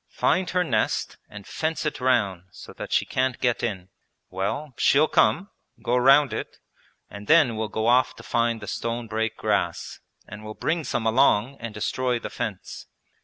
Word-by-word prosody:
'Find 185 Hz, 0 st, 0 dB
her 180 Hz, -1 st, +1 dB
nest 110 Hz, -10 st, -1 dB
and 100 Hz, -1 st, -11 dB
fence 160 Hz, 0 st, -3 dB
it 150 Hz, -, -3 dB
round 100 Hz, -8 st, +1 dB
so -, -, -12 dB
that -, -, -8 dB
she -, -, +2 dB
can't 130 Hz, -1 st, -1 dB
get 120 Hz, -1 st, 0 dB
in. 95 Hz, -6 st, -4 dB, 0.4 s
Well, 125 Hz, +10 st, -3 dB
she'll 150 Hz, +5 st, +4 dB
come, 195 Hz, +6 st, +2 dB, 0.3 s
go 120 Hz, -, -1 dB
round 135 Hz, +3 st, +5 dB
it, -, -, -6 dB, 0.5 s
and 100 Hz, 0 st, -11 dB
then 155 Hz, -8 st, +5 dB
will 110 Hz, 0 st, -3 dB
go 110 Hz, +1 st, -2 dB
off 125 Hz, +2 st, +3 dB
to -, -, -13 dB
find 115 Hz, -1 st, 0 dB
the -, -, -8 dB
stone 115 Hz, 0 st, -3 dB
break 110 Hz, 0 st, -2 dB
grass 100 Hz, -6 st, -2 dB, 0.3 s
and 105 Hz, +2 st, -10 dB
will 110 Hz, 0 st, -8 dB
bring 160 Hz, -1 st, -2 dB
some 120 Hz, -2 st, -2 dB
along 120 Hz, +2 st, +3 dB
and 115 Hz, -1 st, -6 dB
destroy 125 Hz, +4 st, -1 dB
the -, -, -7 dB
fence. -, -, -6 dB
120 Hz, 175 wpm, -24 LUFS, 110-135 Hz, 0.5 s, round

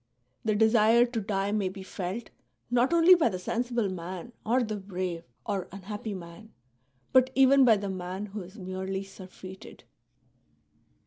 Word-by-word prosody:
The 215 Hz, -2 st, +1 dB
desire 220 Hz, +2 st, +5 dB
to 235 Hz, -2 st, -3 dB
die 195 Hz, -1 st, -1 dB
may 205 Hz, -3 st, 0 dB
be 190 Hz, 0 st, -9 dB
felt, 190 Hz, +4 st, -5 dB, 0.4 s
not 245 Hz, +3 st, +3 dB
only 340 Hz, +2 st, +7 dB
by 340 Hz, -9 st, +4 dB
the 185 Hz, -, -4 dB
sensible 235 Hz, +4 st, -1 dB
man 185 Hz, +3 st, -6 dB
or 245 Hz, +3 st, +2 dB
the 215 Hz, -2 st, -3 dB
brave 185 Hz, -3 st, -4 dB, 0.2 s
or 195 Hz, -3 st, -2 dB
unhappy 205 Hz, +2 st, -6 dB
man, 185 Hz, +5 st, -11 dB, 0.6 s
but 260 Hz, 0 st, +6 dB
even 270 Hz, +1 st, +6 dB
by 230 Hz, -4 st, +6 dB
the 200 Hz, 0 st, -4 dB
man 185 Hz, +1 st, -4 dB
who 210 Hz, 0 st, -7 dB
is 185 Hz, +4 st, -12 dB
merely 190 Hz, 0 st, -4 dB
surfeited." 190 Hz, -1 st, -12 dB
205 Hz, 150 wpm, -28 LUFS, 185-235 Hz, 0.6 s, only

